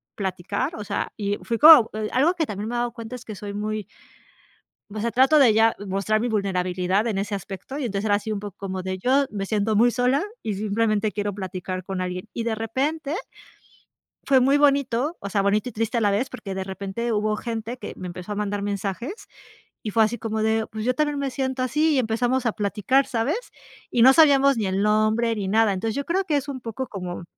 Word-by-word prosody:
platicar," 195 - -3
o 210 - -6
sea, - - -3
y 205 -1 -1
fui 230 - -1
como 300 -7 +9 0.2
algo 310 +8 +3
que 320 -3 0
también 210 0 -5
me 240 - -3
he - - 0
dado 240 0 -1
cuenta 230 0 -7
es 250 - -11
que 215 - -7
soy 200 0 -7
muy 215 -1 -3 1.1
o 215 - -4
sea, 230 +2 -1
trato 270 +5 +5
de 245 -7 +6
ya 225 +1 +4
mostrar 195 +3 0
mi 245 - -1
vulnerabilidad 190 0 0
en 205 -4 -1
ese 200 +1 -2
aspecto 195 +8 -7
y 280 - -3
empezar 205 -1 -2
así 210 +2 +1
un 205 - -3
poco 205 -2 -8
como 190 -1 -4
de: 185 0 -4
"Yo, 270 +6 +2
me 195 -2 -4
siento 215 0 0
muy 235 +3 +5
sola 255 +4 +2 0.2
y 215 -2 -2
simplemente 215 +1 0
quiero 205 0 -2
platicar 185 -1 -5
con 190 -1 -4
alguien" 180 +3 -4
y 230 - -2
de 230 -1 0
repente 280 +7 -2 1.1
fue 265 -2 +5
muy 275 +3 +4
bonito, 280 +1 +2
o 200 - -5
sea, 200 0 +1
bonito 210 +5 +1
y - - -16
triste 225 +2 -2
a - - +2
la 205 -2 +3
vez, 220 +7 0
porque 215 -6 -7
de 190 - -3
repente 200 +5 -4
hubo 215 0 0
gente 230 +1 -5
que - - -7
me 185 - -7
empezó 180 +3 -7
a - - -2
mandar 205 -1 -2
mensajes 205 - -3 0.7
y 215 - -3
fue 225 +1 +4
así 230 +3 0
como 220 0 -3
de: 220 0 +1
"Pues 220 +1 -5
yo 255 - +2
también 295 -1 0
me 275 -1 -1
siento 260 0 -2
así," 300 +5 +2
y - - +3
empezamos 245 +2 0
a 230 - +2
platicar, 215 +6 +1
¿sabes?, 255 - -1 0.5
y 240 - +2
no 260 +3 +9
sabíamos 275 -4 +5
ni 215 - 0
el 190 +1 0
nombre 215 +2 +2
ni 200 -2 -3
nada, 220 +1 +3
entonces 215 +4 -2
yo 280 - -2
creo 380 +3 0
que 300 -5 +1
es 285 - -3
un 260 -3 -5
poco 235 +3 -5
como 180 -3 -6
220 Hz, 225 wpm, -24 LUFS, 200-255 Hz, 1.1 s, como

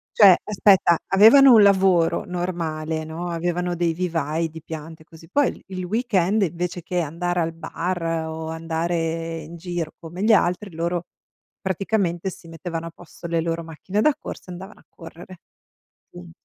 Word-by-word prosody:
Cioè, 195 -4 +8
aspetta, 195 -4 +4
avevano 240 +7 +8
un 220 - +8
lavoro 190 -4 +3
normale, 165 -3 -3
no, 165 +3 -5
avevano 175 +1 -2
dei 170 -1 0
vivai, 165 -2 -2
di 160 +1 -10
piante, 160 +1 -9
così. 165 0 -16
Poi 285 +6 +3
il - - -6
il 185 -1 -5
weekend, 210 -2 +1
invece 175 -1 -2
che 180 +2 -2
andare 175 +3 -2
al 165 -1 -1
bar 165 +2 -4 0.2
o 160 0 -5
andare 165 0 -2
in 165 +3 -10
giro 170 -2 -4
come 170 +3 -9
gli 220 +1 +5
altri, 195 0 +1
loro 170 +1 -2 0.6
praticamente 190 -1 -1
si 170 -2 -12
mettevano 165 0 -5
a - - -8
posto 170 0 -14
le 170 0 0
loro 165 0 -2
macchine 165 +6 -3
da 305 +5 +4
corsa - - -9
e - - -6
andavano 190 +4 -11
a - - -31
correre. 175 +1 -12 0.7
Quindi 175 -1 -12
175 Hz, 165 wpm, -23 LUFS, 165-185 Hz, 0.7 s, Cioè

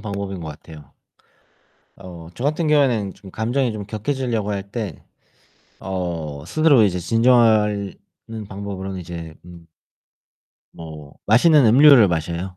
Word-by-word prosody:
방법인 100 -2 -5
것 80 - -7
같아요. 75 -1 -13 1.0
어 85 -4 -11
저 125 - -7
같은 155 +2 0
경우에는 125 -10 +1
좀 95 - -14
감정이 120 +3 -1
좀 105 -2 -6
격해지려고 115 -1 -3
할 100 -1 -3
때 105 - -6 0.8
어 85 -6 -5
스스로 155 - +3
이제 90 -3 0
진정하는 110 -1 +2 0.6
방법으로는 95 -1 -6
이제 85 -2 -8
음 85 -1 -14 1.1
뭐 80 -3 -11
맛있는 140 +5 +5
음료를 125 -2 +7
마셔요. 85 +3 -4
100 Hz, 265 characters per minute, -20 LUFS, 85-120 Hz, 1.1 s, 음료를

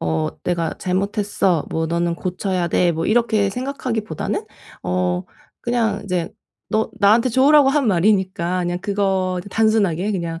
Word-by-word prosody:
"어 80 -1 -1
내가 170 -2 -1
잘못했어." 195 -2 0
뭐 160 0 -1
"너는 170 +1 0
고쳐야 185 0 -2
돼." 175 +1 +2
뭐 165 +1 -3
이렇게 215 -3 +2
생각하기보다는 240 - -3 0.4
어 90 0 -1 0.4
그냥 230 -4 0
이제 180 -3 -2 0.4
너 220 +1 0
나한테 220 +5 +4
좋으라고 275 +3 +5
한 280 -2 +2
말이니까 185 -2 +1
그냥 175 0 -2
그거 190 -2 0
단순하게 210 -4 +1
그냥 170 -3 -3
190 Hz, 305 characters per minute, -20 LUFS, 170-220 Hz, 0.4 s, 좋으라고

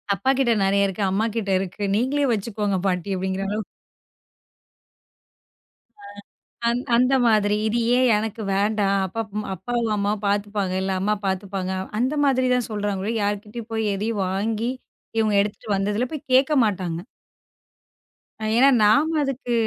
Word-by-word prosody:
"அப்பா 260 +9 +1
கிட்ட 240 -3 +3
நிறைய 200 +1 +3
இருக்கு, 195 +1 -3
அம்மா 210 +4 +1
கிட்ட 205 -3 -1
இருக்கு. 190 +2 -5
நீங்களே 275 +5 +1
வச்சுக்கோங்க 205 -2 -1
பாட்டி" 180 0 -1
அப்படிங்கிற 190 +1 -2
அளவுக்கு 210 +1 -3 2.4
அ - - -11 0.6
அந்த 240 +2 0
அந்த 250 +3 +3
மாதிரி, 210 -2 +3
"இது 230 +2 0 0.2
ஏன் 255 0 +4
எனக்கு 220 +1 -4
வேண்டாம்? 200 0 +1
அப்பா, 225 +5 -3 0.3
அப்பாவோ 235 +6 -2
அம்மாவோ 205 +1 -1
பார்த்துப்பாங்க, 200 -1 -1
இல்ல 190 0 -1
அம்மாவே 205 +2 -1
பார்த்துப்பாங்க" 190 0 -2 0.3
அந்த 255 +4 +1
மாதிரிதான் 255 -3 +2
சொல்றாங்க. 205 -1 -2
யார்கிட்டயும் 210 +3 -3
போய் 220 -1 0
எதையும் 210 +1 -2
வாங்கி 215 +5 -1 0.5
இவங்க 220 -1 +2
எடுத்திட்டு 205 +2 -5
வந்ததெல்லாம் 210 +5 -1
போய் 300 -2 -7
கேட்க 265 +4 +4
மாட்டாங்க. 180 -4 -2 1.5
ஏன்னா 255 +4 +6
நாம 295 +10 +4
அதுக்கு, 265 -3 -3
210 Hz, 130 wpm, -23 LUFS, 195-235 Hz, 2.4 s, ஏன்னா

